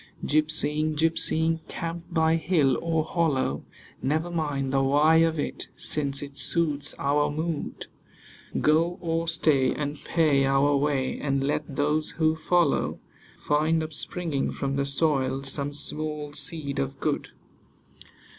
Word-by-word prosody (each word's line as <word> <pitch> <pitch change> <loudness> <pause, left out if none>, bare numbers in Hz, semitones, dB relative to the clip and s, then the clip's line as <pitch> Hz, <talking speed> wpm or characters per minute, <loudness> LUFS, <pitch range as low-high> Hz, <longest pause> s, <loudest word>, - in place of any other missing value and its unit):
Gypsying, 155 0 +1
gypsying, 160 +1 +2
camp 170 0 -5
by 160 -1 +3
hill 155 -6 +2
or 165 -1 0
hollow; 145 - 0 0.4
Never 155 +6 -1
mind 145 -5 -2
the 135 - +3
why 145 +4 +4
of 165 0 +3
it, 145 - -4
since 140 -2 0
it 140 -1 -5
suits 150 -4 +1
our 145 +1 +1
mood. 155 +1 -4 0.7
Go 165 +4 +2
or 165 -1 -2
stay, 155 -5 +2
and 145 0 -4
pay 155 -5 +2
our 135 +1 +3
way, 140 -2 0
and 140 -1 -1
let 145 0 -2
those 150 +2 0
who 160 -1 +2
follow 170 -1 +1 0.4
Find, 155 +2 +1
upspringing 155 -1 -2
from 140 0 -2
the 140 0 0
soil, 135 -2 +1
some 140 +1 -2
small 150 0 -4
seed 145 -1 -1
of 135 0 -3
good. 150 -2 -1
150 Hz, 130 wpm, -26 LUFS, 140-160 Hz, 0.7 s, why